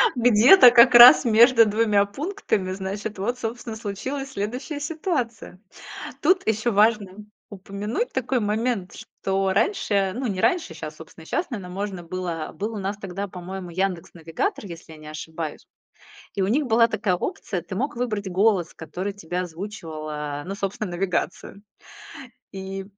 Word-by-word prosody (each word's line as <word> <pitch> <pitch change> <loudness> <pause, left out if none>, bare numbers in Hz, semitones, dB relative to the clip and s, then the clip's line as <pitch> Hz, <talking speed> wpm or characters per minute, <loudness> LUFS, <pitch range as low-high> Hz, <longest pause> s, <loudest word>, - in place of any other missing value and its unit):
где-то 245 - +7
как 240 +1 +7
раз 245 +2 +10
между 230 +1 +6
2 210 -1 +2
пунктами, 215 - -3
значит, 200 +2 -5
вот, 240 +6 -2
собственно, 230 -1 -5
и - - -7
случилась 265 +7 -5
следующая 250 +9 -4
ситуация. 290 - -4 0.6
Тут 370 0 +2
ещё 220 +2 0
важно 210 -1 +1 0.3
упомянуть 205 - -4
такой 255 -1 -1
момент, 210 -2 -1
что 195 0 -2
раньше, 200 - +1
ну 255 +1 -3
не 190 -4 -2
раньше, 355 -3 +1
щас, - - -8
собственно, - - -13
и - - -16
щас, 340 - -2
наверно, 195 -6 -6
можно 195 -2 -4
было, 170 -2 -4
э, - - -16
был 210 +7 -4
у - - -4
нас 195 +1 -3
тогда, 195 0 -5
по-моему, 180 0 -8
"Яндекс 185 -1 -2
Навигатор", 165 +5 -3
если 170 -3 -10
я 155 - -12
не 155 - -13
ошибаюсь, 155 0 -7 0.7
и 195 - -1
у - - 0
них 275 +7 +1
была 230 0 +4
такая 190 -5 0
опция, 180 0 -4
ты 185 - -7
мог 260 +4 -2
выбрать 215 -5 -3
голос, 190 -2 +1
который 180 +5 -5
тебе 180 -2 -5
озвучивал, 165 -3 -6
э, 145 -1 -5
ну 195 - -5
собственно, 200 -1 -4
навигацию. 185 +2 -3 0.9
И, 195 0 -6
200 Hz, 160 wpm, -24 LUFS, 185-235 Hz, 0.9 s, раз